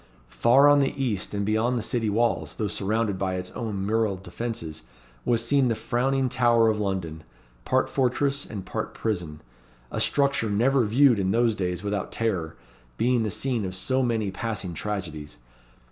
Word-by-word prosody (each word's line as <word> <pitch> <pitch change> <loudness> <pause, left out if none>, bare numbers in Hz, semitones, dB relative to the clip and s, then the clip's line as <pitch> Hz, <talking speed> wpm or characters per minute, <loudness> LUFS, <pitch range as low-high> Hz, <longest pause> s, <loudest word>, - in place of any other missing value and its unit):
Far 135 +5 +5
on 145 0 +6
the 140 0 0
east, 110 -7 -2
and 100 0 -1
beyond 110 +4 +1
the 115 - -2
city 115 -2 0
walls, 115 +3 0
though 105 - -1
surrounded 105 0 -1
by 95 -1 -1
its 90 0 -5
own 105 -5 -4
mural 110 -1 +1
defences, 90 -3 -6 0.4
was 115 -1 +2
seen 135 +1 +3
the 115 - +1
frowning 130 +4 0
Tower 120 -2 +3
of 105 -1 0
London 90 -6 -3 0.4
part - - +2
fortress 140 +2 0
and 100 -4 -7
part - - -4
prison 85 - -3 0.5
a - - -2
structure 140 -5 +2
never 120 +5 +2
viewed 120 +1 +4
in 95 -1 0
those 115 +2 +3
days 90 -2 -3
without 100 -1 -2
terror, 95 -9 -2 0.4
being 125 0 +2
the 110 - -1
scene 115 +2 -1
of 95 -1 -3
so 130 +8 0
many 115 -5 0
passing 100 -3 -4
tragedies. 80 -8 -5
110 Hz, 170 wpm, -26 LUFS, 95-120 Hz, 0.5 s, on